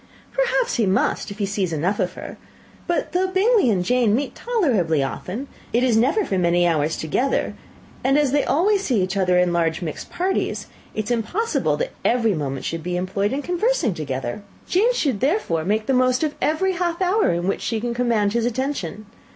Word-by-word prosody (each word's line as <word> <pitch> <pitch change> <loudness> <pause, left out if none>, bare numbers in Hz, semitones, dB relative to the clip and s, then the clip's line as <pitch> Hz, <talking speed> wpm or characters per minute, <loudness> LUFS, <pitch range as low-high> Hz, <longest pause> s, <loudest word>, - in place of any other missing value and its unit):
"Perhaps - - +1
he 225 -4 +2
must, 190 +1 +1
if 200 - -8
he 205 - 0
sees 195 -3 -1
enough 170 +6 -1
of - - 0
her. - - -8 0.5
But 345 -1 -1
though 370 +1 +1
Bingley 390 - +3
and 185 -4 +1
Jane 240 -1 +3
meet 280 +3 -2
tolerably 225 - +1
often, 195 - -5 0.2
it 240 +2 +2
is 250 -3 +3
never 280 - +2
for 190 - -1
many 175 0 +3
hours 155 -1 +1
together; 245 - 0 0.5
and 270 +2 +3
as 290 -3 +2
they 285 0 +2
always 390 +7 +2
see 235 - +1
each 185 +2 -2
other 180 -2 +2
in 180 -1 +3
large 165 0 0
mixed 155 -3 -6
parties, 375 +2 -1 0.3
it 215 - -1
is 220 - -5
impossible 290 - 0
that - - -2
every 230 -3 +2
moment 135 -5 -3
should 165 0 -3
be 180 +2 -2
employed 195 +3 -1
in 280 +2 -2
conversing 355 - +1
together. 135 - -4 0.3
Jane 425 +7 +3
should 280 - 0
therefore 265 - 0
make 215 +5 0
the 265 - +1
most 255 +2 +2
of 305 -1 0
every 350 +5 +1
half 345 -1 -1
hour 380 - +2
in 175 +1 -1
which 195 - -1
she 225 -1 -1
can 240 +1 -2
command 230 -4 +1
his 235 0 +1
attention. 240 - -3
230 Hz, 200 wpm, -22 LUFS, -, 0.5 s, Bingley